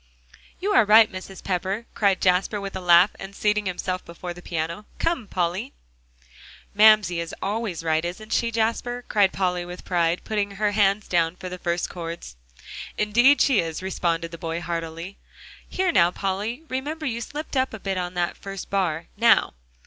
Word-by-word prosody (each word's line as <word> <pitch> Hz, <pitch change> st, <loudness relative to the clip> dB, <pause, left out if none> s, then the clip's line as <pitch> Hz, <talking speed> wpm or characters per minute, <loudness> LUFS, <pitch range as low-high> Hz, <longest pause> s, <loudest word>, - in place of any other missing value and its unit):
"You 395 Hz, +3 st, -1 dB
are 395 Hz, -, +6 dB
right, 215 Hz, +1 st, +6 dB
Mrs. 190 Hz, +1 st, -9 dB
Pepper," 195 Hz, +4 st, -2 dB
cried 200 Hz, -3 st, +2 dB
Jasper 185 Hz, +3 st, +2 dB
with 195 Hz, -1 st, -6 dB
a -, -, -2 dB
laugh, 175 Hz, +2 st, +6 dB
and 195 Hz, +1 st, -8 dB
seating 210 Hz, -1 st, +1 dB
himself 185 Hz, 0 st, -3 dB
before 175 Hz, +1 st, -7 dB
the 175 Hz, -, -12 dB
piano. 170 Hz, +4 st, -4 dB
"Come, 330 Hz, -10 st, -1 dB
Polly!" 185 Hz, +9 st, -2 dB, 1.0 s
"Mamsie 210 Hz, -4 st, +5 dB
is 170 Hz, 0 st, -5 dB
always 205 Hz, -4 st, -3 dB
right, 160 Hz, 0 st, +1 dB
isn't 200 Hz, +6 st, -5 dB
she, 235 Hz, -, +2 dB
Jasper?" 230 Hz, +2 st, -1 dB
cried 200 Hz, -3 st, +3 dB
Polly 180 Hz, -2 st, -1 dB
with 175 Hz, +1 st, -9 dB
pride, 170 Hz, -1 st, +1 dB
putting 205 Hz, -2 st, -1 dB
her 210 Hz, +1 st, +1 dB
hands 205 Hz, 0 st, +2 dB
down 170 Hz, -1 st, +1 dB
for 185 Hz, 0 st, -7 dB
the 180 Hz, 0 st, -7 dB
first 170 Hz, 0 st, -1 dB
chords. 170 Hz, -, -7 dB, 0.6 s
"Indeed 240 Hz, +7 st, +4 dB
she 265 Hz, -7 st, +4 dB
is," 165 Hz, +1 st, -3 dB
responded 170 Hz, -3 st, -1 dB
the 170 Hz, -, -9 dB
boy 165 Hz, 0 st, -3 dB
heartily. 165 Hz, +2 st, -5 dB, 0.5 s
"Here 375 Hz, -1 st, +1 dB
now, 170 Hz, -, +5 dB
Polly, 200 Hz, -, -3 dB
remember, 300 Hz, +4 st, -4 dB
you 235 Hz, -4 st, -2 dB
slipped 295 Hz, +5 st, -6 dB
up 260 Hz, 0 st, +1 dB
a 220 Hz, -, -7 dB
bit 195 Hz, -1 st, -2 dB
on 180 Hz, 0 st, -4 dB
that 175 Hz, -1 st, -1 dB
first 195 Hz, -1 st, -8 dB
bar. 175 Hz, -5 st, 0 dB
Now!" 230 Hz, -1 st, +4 dB
195 Hz, 175 wpm, -24 LUFS, 175-215 Hz, 1.0 s, are